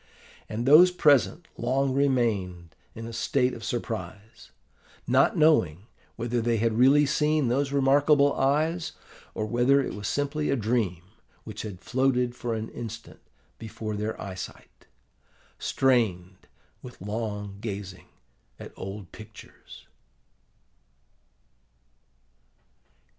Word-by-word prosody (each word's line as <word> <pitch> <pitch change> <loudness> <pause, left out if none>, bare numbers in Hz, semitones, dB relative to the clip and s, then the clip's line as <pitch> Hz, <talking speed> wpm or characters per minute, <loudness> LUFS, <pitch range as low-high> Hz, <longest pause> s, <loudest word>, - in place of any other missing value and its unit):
And 115 +3 -3
those 155 +7 +8
present 155 -1 +2
long 130 +3 0
remained 105 - 0 0.2
in 115 - -7
a 115 - -7
state 125 +2 0
of 115 - -9
surprise, 110 -2 -6 0.6
not - - +3
knowing 105 - +3 0.3
whether 120 +1 -2
they 115 0 +1
had 115 +1 +1
really 135 +6 +5
seen 150 -1 +1
those 135 +3 0
remarkable 140 +1 +4
eyes, 155 +5 0 0.4
or 110 - -2
whether 120 +5 +3
it 135 - -2
was 105 0 -5
simply 145 +3 -1
a - - +2
dream 110 -7 -1 0.4
which 110 -1 -7
had 100 -5 -8
floated 125 -2 0
for 120 -2 -3
an 110 0 -5
instant 115 -1 -8 0.4
before 110 -1 -6
their 105 +2 -4
eyesight, 95 -2 -9 0.7
strained 95 -9 0 0.3
with 125 - -12
long 105 -1 -5
gazing 100 -4 -6 0.5
at - - -10
old 95 -3 -8
pictures. 110 0 -14
115 Hz, 110 wpm, -26 LUFS, 105-135 Hz, 0.7 s, those